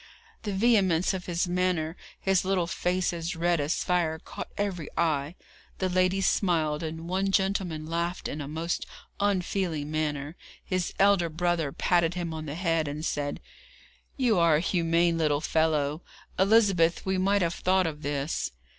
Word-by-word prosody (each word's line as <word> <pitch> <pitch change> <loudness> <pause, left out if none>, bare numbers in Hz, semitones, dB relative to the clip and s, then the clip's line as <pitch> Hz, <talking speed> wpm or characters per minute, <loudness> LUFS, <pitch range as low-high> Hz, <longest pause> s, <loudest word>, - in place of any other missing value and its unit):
The 210 - -3
vehemence 195 -5 +3
of 185 -1 -5
his 175 0 0
manner, 175 -3 0 0.2
his 195 -1 +2
little 190 -2 +1
face 180 +2 -1
as 170 +1 -3
red 170 0 +1
as 145 +3 0
fire, 170 -3 +1
caught - - -8
every 190 -6 -2
eye. 155 -1 0 0.4
The 185 - 0
ladies 185 +1 +2
smiled, 160 -6 +1
and 160 +1 -5
one 190 +2 0
gentleman 190 -5 0
laughed 170 +2 -2
in 150 - -5
a 140 - -5
most 160 +3 -3 0.3
unfeeling 185 -6 -1
manner. 150 -1 -2 0.3
His 185 -2 -1
elder 195 -4 +4
brother 165 -2 0
patted 175 +2 +1
him 170 -2 -3
on 155 -1 -6
the 145 - -4
head, 165 -3 0
and 150 +2 -4
said: 145 -2 -2 0.8
'You 240 -8 +3
are 165 -2 +5
a - - +3
humane 170 -1 +1
little 150 -2 +2
fellow. 155 -1 +1 0.4
Elizabeth, 190 -5 +4
we 190 -1 0
might 195 +1 +2
have 170 0 0
thought 185 +1 +2
of 155 -2 -4
this.' 145 0 -2
170 Hz, 160 wpm, -27 LUFS, 155-185 Hz, 0.8 s, are